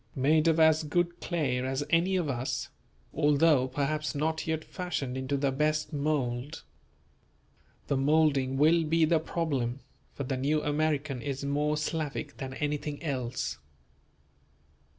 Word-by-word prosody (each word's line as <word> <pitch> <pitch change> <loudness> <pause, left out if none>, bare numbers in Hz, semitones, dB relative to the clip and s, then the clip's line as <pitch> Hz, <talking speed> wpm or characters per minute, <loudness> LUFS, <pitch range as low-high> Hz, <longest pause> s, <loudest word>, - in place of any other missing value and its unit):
Made 155 +4 +3
of 165 0 +3
as 160 0 +5
good 175 +3 -1
clay 145 -8 -1
as 130 +2 -1
any 175 +3 +3
of 175 -4 0
us, 130 -1 -2 0.4
although 150 -2 +4
perhaps 150 +3 -2
not 160 +3 -1
yet 160 -1 -2
fashioned 160 -8 -4
into 130 +2 -1
the 140 0 +1
best 150 +3 0
mould. 140 -1 -2 1.2
The 140 - 0
moulding 140 -2 +2
will 160 +4 +4
be 160 +1 +3
the 160 0 +3
problem; 140 -6 -2 0.3
for 140 - -3
the 130 0 -2
New 150 +4 +1
American 150 -3 0
is 140 0 -4
more 150 +2 0
Slavic 150 -2 -3
than 130 -2 -6
anything 150 +1 -3
else. 130 - -3
150 Hz, 135 wpm, -29 LUFS, 135-160 Hz, 1.2 s, as